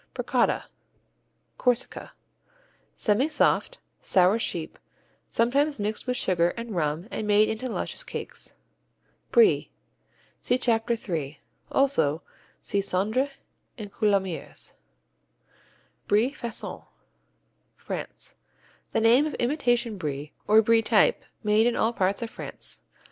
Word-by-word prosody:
Bricotta - - +1 0.9
Corsica 250 -1 -1 0.8
Semisoft, 285 - +1 0.2
sour 190 +4 +3
sheep, 165 -7 -3 0.5
sometimes 280 +4 +1
mixed 210 +4 -3
with 250 0 0
sugar 175 -2 +1
and 230 -3 -5
rum 155 +2 -1
and 215 - -3
made 210 +1 +5
into 220 +4 -3
small 235 - -5
luscious - - -4
cakes. - - -7 0.8
Brie 455 -4 +4 0.7
see 245 - +1
Chapter 235 -2 +1
3; 155 -9 -4 0.3
also 165 - +2 0.4
see 200 - 0
Cendré 210 +8 0 0.5
and 205 -3 -8
Coulommiers. 195 -6 -1 1.3
Brie 220 +6 +3
Façon 235 -6 -6 0.9
France - - -7 0.6
The 225 - +2
name 240 +7 +5
of 305 - -5
imitation 240 -5 0
Brie 145 -2 -4
or 220 +1 +6
Brie 230 +1 +4
type 480 - +3 0.2
made 215 +2 +4
in 240 - +1
all 225 +2 +1
parts 195 +2 0
of 225 - -6
France. - - -6
220 Hz, 110 wpm, -26 LUFS, 190-245 Hz, 1.3 s, or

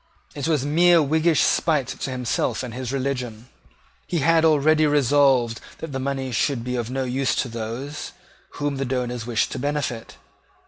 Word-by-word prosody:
It 145 0 -3
was 150 -5 +1
mere 170 +3 +5
Whiggish 160 +2 +2
spite 150 -7 +2
to - - -4
himself 125 -2 -1
and 125 -3 -6
his 125 0 -4
religion. 125 -4 -3 0.6
He 175 - -1
had 165 +2 +3
already 155 0 +4
resolved 135 -4 +3 0.2
that 160 - -7
the 135 - -3
money 135 -1 -3
should 120 +1 0
be 125 +1 -3
of 120 -2 -3
no 135 +1 -2
use 130 +1 0
to - - 0
those 120 +5 -6 0.4
whom 145 -1 -2
the 135 - -2
donors 125 -2 -3
wished 115 -3 0
to - - -4
benefit. 140 -4 -3
135 Hz, 170 wpm, -23 LUFS, 125-150 Hz, 0.6 s, mere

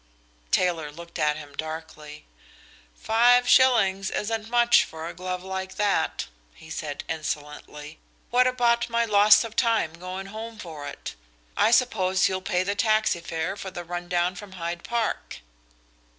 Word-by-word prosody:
Taylor 165 - +1
looked 170 +2 -10
at 150 0 +1
him 145 -2 -10
darkly. 155 - -7 0.7
"Five 245 - +4
shillings 195 -8 +4
isn't 220 +1 -3
much 240 0 +5
for 160 0 -8
a - - -6
glove 180 0 -5
like 190 0 -5
that," 200 -6 0 0.3
he 160 - -14
said 145 -2 -5
insolently. 150 -1 -6 0.3
"What 250 +1 +4
about 240 -2 +2
my 235 0 +1
loss 210 0 +6
of 225 -1 -8
time 225 -9 +1
going 185 +3 -7
home 225 +1 -7
for 155 -7 -8
it? 140 - -7 0.4
I - - +4
suppose 205 -7 +3
you'll 185 0 -2
pay 180 0 0
the 200 +2 -1
taxi 215 -4 +2
fare 165 +2 -3
for 195 - -7
the 175 -1 -7
run 175 +1 -6
down 175 0 +1
from 190 +1 -11
Hyde 170 -1 -5
Park?" 235 - -3
185 Hz, 150 wpm, -25 LUFS, 160-225 Hz, 0.7 s, loss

